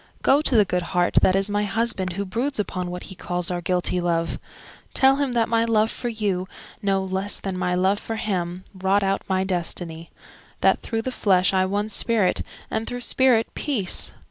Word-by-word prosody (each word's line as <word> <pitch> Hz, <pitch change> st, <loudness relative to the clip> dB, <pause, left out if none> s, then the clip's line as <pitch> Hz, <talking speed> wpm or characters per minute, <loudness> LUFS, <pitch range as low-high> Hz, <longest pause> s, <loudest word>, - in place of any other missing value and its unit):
Go 280 Hz, +2 st, +5 dB
to 280 Hz, -, +1 dB
the 210 Hz, -2 st, +6 dB
good 180 Hz, -1 st, -1 dB, 0.2 s
heart 175 Hz, 0 st, +4 dB
that 185 Hz, -, +4 dB
is 195 Hz, +1 st, +2 dB
my 205 Hz, 0 st, 0 dB
husband 205 Hz, -3 st, -1 dB
Who 200 Hz, +2 st, -3 dB
broods 245 Hz, +9 st, -2 dB
upon 185 Hz, -3 st, -2 dB
what 180 Hz, 0 st, -6 dB
he -, -, -9 dB
calls 180 Hz, -1 st, -1 dB
our 175 Hz, -1 st, -2 dB
guilty 180 Hz, 0 st, 0 dB
love:— 170 Hz, -1 st, -1 dB, 0.6 s
Tell 270 Hz, +1 st, +5 dB
him 280 Hz, -3 st, -1 dB
that 230 Hz, -1 st, +2 dB
my 230 Hz, 0 st, +2 dB
love 225 Hz, -1 st, +2 dB
for 240 Hz, -, -4 dB
you, 200 Hz, -5 st, -2 dB, 0.3 s
no 195 Hz, -2 st, +1 dB
less 190 Hz, +2 st, -2 dB
than 195 Hz, -2 st, -4 dB
my 180 Hz, -1 st, 0 dB
love 190 Hz, +3 st, +2 dB
for 225 Hz, -, -5 dB
him 185 Hz, -4 st, -3 dB
Wrought 195 Hz, +1 st, +1 dB
out 195 Hz, 0 st, 0 dB
my 190 Hz, 0 st, +1 dB
destiny—that 170 Hz, -2 st, -3 dB
through 225 Hz, -1 st, -3 dB
the 260 Hz, -, -3 dB
flesh 190 Hz, -5 st, +2 dB
I 185 Hz, 0 st, +2 dB
won 205 Hz, +2 st, -1 dB
spirit, 215 Hz, -2 st, +2 dB, 0.3 s
and 220 Hz, 0 st, -2 dB
through 245 Hz, 0 st, -4 dB
spirit, 245 Hz, -2 st, +3 dB
peace. 225 Hz, -12 st, 0 dB
195 Hz, 195 wpm, -23 LUFS, 180-225 Hz, 0.6 s, the